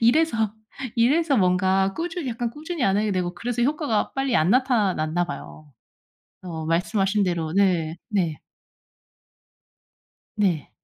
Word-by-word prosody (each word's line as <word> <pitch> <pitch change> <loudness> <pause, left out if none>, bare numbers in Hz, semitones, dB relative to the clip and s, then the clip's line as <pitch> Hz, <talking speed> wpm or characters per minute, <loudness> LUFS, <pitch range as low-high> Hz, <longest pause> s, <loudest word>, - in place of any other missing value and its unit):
이래서 230 -4 +3 0.4
이래서 280 +5 +3
뭔가 190 0 +2
꾸준히 335 -4 -3
약간 235 0 -2
꾸준히 310 +3 -5
안 195 0 +3
하게 210 -1 +1
되고 180 -1 -1
그래서 240 +4 -2
효과가 285 -5 0
빨리 270 -2 0
안 155 +4 +3
나타났나 200 - +2
봐요. 155 -3 -9 0.7
어 165 -3 -5
말씀하신 195 +5 +1
대로 170 -4 -1
네 175 -5 +2
네. 175 -8 0 2.0
네. 185 -8 0
200 Hz, 255 characters per minute, -24 LUFS, 175-245 Hz, 2.0 s, 이래서